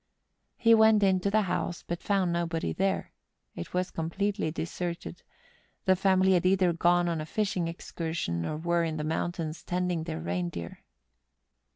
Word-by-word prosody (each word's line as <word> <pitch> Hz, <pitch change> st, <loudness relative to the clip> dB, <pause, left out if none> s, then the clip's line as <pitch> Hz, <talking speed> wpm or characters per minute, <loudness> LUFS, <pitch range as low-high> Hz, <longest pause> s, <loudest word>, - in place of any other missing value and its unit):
He 230 Hz, -1 st, +5 dB
went 220 Hz, -1 st, +6 dB
into 190 Hz, 0 st, +3 dB
the 215 Hz, +1 st, +3 dB
house, 175 Hz, -2 st, -2 dB
but 170 Hz, 0 st, -3 dB
found 190 Hz, -4 st, +1 dB
nobody 170 Hz, -1 st, -1 dB
there; 195 Hz, 0 st, -1 dB, 0.4 s
it 85 Hz, -, -7 dB
was 180 Hz, 0 st, -1 dB
com¬ 165 Hz, 0 st, -3 dB
pletely 200 Hz, -3 st, -1 dB
deserted; 170 Hz, +1 st, -5 dB, 0.6 s
the 190 Hz, -2 st, +5 dB
family 190 Hz, 0 st, +3 dB
had 175 Hz, -, +3 dB
either 185 Hz, -1 st, +3 dB
gone 175 Hz, +1 st, +3 dB
on 165 Hz, -2 st, -1 dB
a -, -, -4 dB
fishing 190 Hz, -3 st, -1 dB
excursion, 165 Hz, -, -3 dB
or 150 Hz, -, -3 dB
were 170 Hz, +1 st, +1 dB
in 160 Hz, -1 st, -2 dB
the 150 Hz, -, -3 dB
mountains 160 Hz, 0 st, -2 dB
tending 180 Hz, -2 st, -1 dB
their 80 Hz, -, -4 dB
rein 85 Hz, +2 st, -2 dB
deer. 85 Hz, 0 st, -7 dB
175 Hz, 165 wpm, -29 LUFS, 160-190 Hz, 0.6 s, went